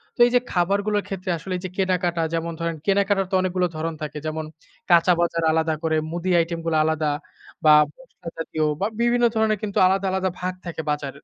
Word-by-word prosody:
তো - - -29
এইযে 245 0 +3
খাবারগুলোর 200 +3 +1
ক্ষেত্রে 190 -1 -5
আসলে 185 +4 -6
এইযে 185 0 -6
কেনাকাটা 180 -3 0
যেমন 165 0 -2
ধরেন 165 -1 -2
কেনাকাটার 200 -1 +2
তো - - +1
অনেকগুলো 180 -1 0
ধরণ 165 +1 -2
থাকে। 150 0 -5
যেমন 155 0 -3 0.5
কাঁচা 170 +1 +6
বাজার 170 -1 0
আলাদা 160 0 +1
করে, 160 -1 +1
মুদি 175 +2 -2
আইটেমগুলো 165 -1 -1
আলাদা 155 -1 0 0.5
বা 155 - +8 0.2
মসলা 260 -9 -16
জাতীয় 160 -1 -2 0.2
বা 200 - +2
বিভিন্ন 240 0 +3
ধরনের 220 -1 +2
কিন্তু 200 -2 -3
আলাদা, 195 +1 +1
আলাদা 190 0 0
ভাগ 185 0 -2
থাকে 165 -2 -4
বাজারের। 145 -2 -5
175 Hz, 180 wpm, -23 LUFS, 165-195 Hz, 0.5 s, বা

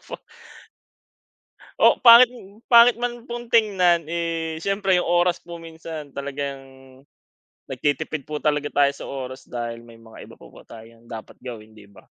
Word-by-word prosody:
opo. - - -9 1.6
Oo, - - +4
pangit 240 0 +8 0.4
pangit 235 0 +7
man 240 0 -5
pong 240 0 -7
tignan. 180 -7 +3
Eh, 165 -1 -3
siyempre 195 -2 +1
yung 180 - 0
oras 175 0 +2
po 170 -1 -9
minsan 160 -2 -9
talagang 140 0 -5 1.1
nagtitipid 145 +2 -3
po 150 -1 -6
talaga 150 -1 -1
tayo 140 -1 +4
sa - - -10
oras 130 -1 -7
dahil 120 -1 -6
may 115 -1 -16
mga 115 -1 -13
iba - - -15
pa - - -16
po - - -16
tayong 115 +1 -15
dapat 115 -2 -10
gawin, 110 -3 -10
di 105 - -15
ba? 100 0 -19
155 Hz, 155 wpm, -22 LUFS, 130-180 Hz, 1.6 s, pangit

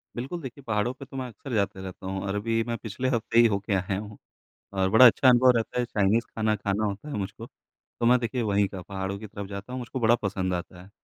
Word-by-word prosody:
बिल्कुल, 135 +9 -4
देखिए, 135 0 -8
पहाड़ों 105 +3 0
पे 135 +1 -11
तो 135 - -9
मैं 130 - -3
अक्सर 125 +2 -9
जाते 100 -3 0
रहता 95 0 -8
हूँ 95 0 -3
और 100 0 -3
अभी 115 +2 0
मैं 115 - -2
पिछले 110 +4 -4
हफ़्ते 115 -1 +1
ही 120 - +8
हो 100 -2 0
के 100 0 -3
आया 95 0 0
हूँ, 105 0 -9 0.6
और 95 -1 +1
बड़ा 110 +6 +8
अच्छा 125 +3 +6
अनुभव 125 +1 +6
रहता 115 +2 -2
है। 120 - +1
चाइनीज़ 105 +1 +1
खाना 110 -1 +1
खाना 105 +1 -1
होता 105 +8 -4
है - - -4
मुझको, 105 +3 -5
तो 115 - -9
मैं 125 +1 +6
देखिए, 120 +1 -2
वहीं 100 -2 +2
का 95 -2 -8
पहाड़ों 95 +1 -4
की 110 - -8
तरफ 100 -1 -7
जाता 100 +5 -7
हूँ, 130 - -3
मुझको 125 +1 -5
बड़ा 115 +1 +5
पसंद 95 -2 -1
आता 90 0 -5
है। 95 - -15
105 Hz, 255 wpm, -27 LUFS, 100-120 Hz, 0.6 s, ही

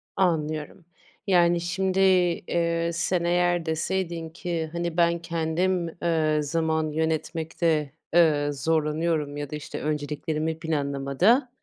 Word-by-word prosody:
Anlıyorum. 155 -1 -1 0.4
Yani, 175 -2 +4
şimdi, 190 +2 -1
eee, 170 -2 +2
sen, 170 +1 0
eğer 175 0 +2
deseydin 165 0 -2
ki, 165 -2 -4
hani, 170 0 -3
ben, 170 0 +3
kendim, 170 +2 -1 0.2
eee, 155 -2 +2
zaman 160 0 0
yönetmekte, 160 -1 -1 0.2
eee, 150 -4 +4
zorlanıyorum 150 0 0
ya 145 -1 -4
da, 150 - -5
işte, 150 - -6
önceliklerimi 155 +1 -2
planlamada, 155 - +1
165 Hz, 110 wpm, -26 LUFS, 155-175 Hz, 0.4 s, Yani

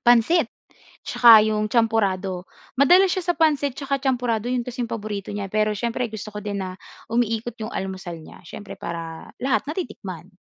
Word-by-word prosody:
Pansit. 240 +9 +5 0.5
Tsaka 230 -3 +7
yung 215 0 +1
champorado. 200 -5 +1 0.3
Madalas 360 +8 +6
siya 370 - -1
sa 350 - +2
pancit 295 -5 +2
tsaka 275 +1 -2
champorado 245 -4 0
yun 250 -1 +1
kasi 245 +1 -4
'yong 230 - -13
paborito 205 -3 -4
niya 200 -1 -4
pero 215 +1 +1
siyempre 235 +3 -2
gusto 220 0 -6
ko 210 - -9
din 200 -1 -3
na 185 -1 -6 0.3
umiikot 230 0 0
yung 225 - -7
almusal 190 -3 -5
niya. - - -13
Siyempre 205 +4 -9
para 165 -1 -6
lahat 250 -5 +1
natitikman. 205 - -6
220 Hz, 165 wpm, -23 LUFS, 200-250 Hz, 0.5 s, Tsaka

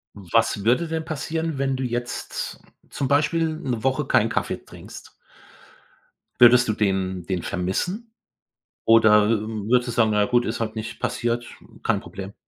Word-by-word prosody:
Was 105 +1 0
würde 140 +9 +2
denn 160 0 -3
passieren, 160 0 -3
wenn 135 -1 0
du 130 - -3
jetzt 120 0 -4 0.3
zum 135 - -3
Beispiel 160 +4 +2
'ne 125 -8 -3
Woche 135 0 +1
keinen - - +3
Kaffee - - -2
trinkst? - - -13 1.3
Würdest 125 0 +7
du 110 - +1
den 95 -3 -1
den 90 -3 -2
vermissen? 180 - -3 0.7
Oder 110 -2 +5
würdest 115 +2 0
du - - -2
sagen: 110 -2 +3
„Na 105 - +2
ja 105 - +4
gut, 120 +1 +2
ist 110 - -3
halt 110 -1 -3
nicht 110 0 -6
passiert, 120 0 -2 0.4
kein - - +1
Problem?“ 95 +1 -9
120 Hz, 155 wpm, -23 LUFS, 105-135 Hz, 1.3 s, Würdest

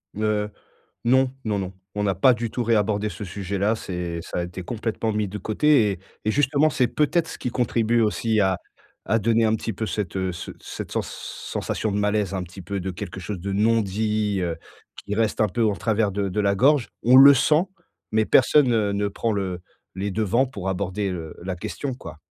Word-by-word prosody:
Heu, 105 0 0 0.6
non, 130 +2 +4
non, 105 -2 0
non. 95 -1 -4 0.2
On 105 0 -1
a 95 - +1
pas 125 +8 +5
du 115 -1 -3
tout 120 - -2
réabordé 105 -2 +1
ce 105 0 -7
sujet 100 +1 -4
là 105 +4 +2
c'est 90 -5 -4
ça 90 0 -3
été 90 +1 -7
complètement 110 +1 -2
mis 105 0 0
de 100 +2 -6
côté 110 +2 +3
et 90 - -7 0.3
et 110 - +2
justement 145 +4 +3
c'est 125 -4 +2
peut-être 155 +6 +1
ce - - -7
qui 125 - -3
contribue 120 -1 +1
aussi 110 0 +1
à 95 -2 +2 0.5
à 115 +3 +2
donner 115 +1 +2
un 110 0 +3
petit 115 - -4
peu 110 +3 -4
cette, 100 -2 -3
heu, 95 -1 0
ce 85 - -7
cette - - -7
sens - - -2
sensation 110 - -4
de 100 - -1
malaise 105 -1 0
un 95 -2 -2
petit 90 +2 -11
peu 100 +4 -4
de 95 - -3
quelque 90 - -7
chose 95 +1 -5
de 100 +3 -4
non-dit, 105 -1 +1
heu, 85 -2 -2 0.5
qui 105 - -3
reste 110 -1 0
un 110 - +4
peu 115 +5 0
en 105 - +2
travers 110 -1 0
de 100 0 -1
de 95 +3 -1
la 100 -1 +2
gorge. 135 +3 +3
On 125 +3 +6
le 140 +2 +10
sent, 150 +6 +3 0.5
mais 110 0 +3
personne, 135 +1 +5
heu, 105 -3 +1
ne 100 0 0
prend 110 +3 -2
le 95 -3 -2 0.4
les 100 +2 -2
devants 110 +5 +2
pour 100 -7 -6
aborder, 95 +1 -2
heu, 80 -3 -6
la 95 0 -4
question, 135 +9 -4
quoi. 75 - -10
105 Hz, 210 wpm, -24 LUFS, 95-115 Hz, 0.6 s, le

